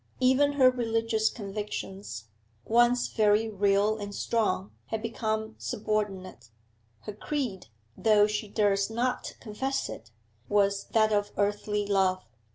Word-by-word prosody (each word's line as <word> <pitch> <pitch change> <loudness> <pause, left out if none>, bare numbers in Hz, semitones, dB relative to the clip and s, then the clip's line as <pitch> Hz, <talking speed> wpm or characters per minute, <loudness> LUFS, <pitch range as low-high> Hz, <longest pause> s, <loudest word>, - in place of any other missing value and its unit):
Even 265 +3 +4
her 260 -3 +6
religious 225 -2 0
convictions, 195 - -6 0.4
once 240 +2 +3
very 215 0 +3
real 205 +1 +2
and 205 -1 -6
strong, 105 - 0 0.2
had 220 - -2
become 220 -1 -3
subordinate; 200 - -3 0.5
her 210 - -7
creed 235 -3 -4 0.3
though 210 -2 +4
she 210 +1 -2
durst 200 -1 +1
not 245 +3 -2
confess 265 +5 -3
it 115 - -9 0.4
was 200 -1 +2
that 215 -1 +2
of 205 0 0
earthly 205 0 0
love. 190 -2 +1
210 Hz, 120 wpm, -28 LUFS, 200-225 Hz, 0.5 s, her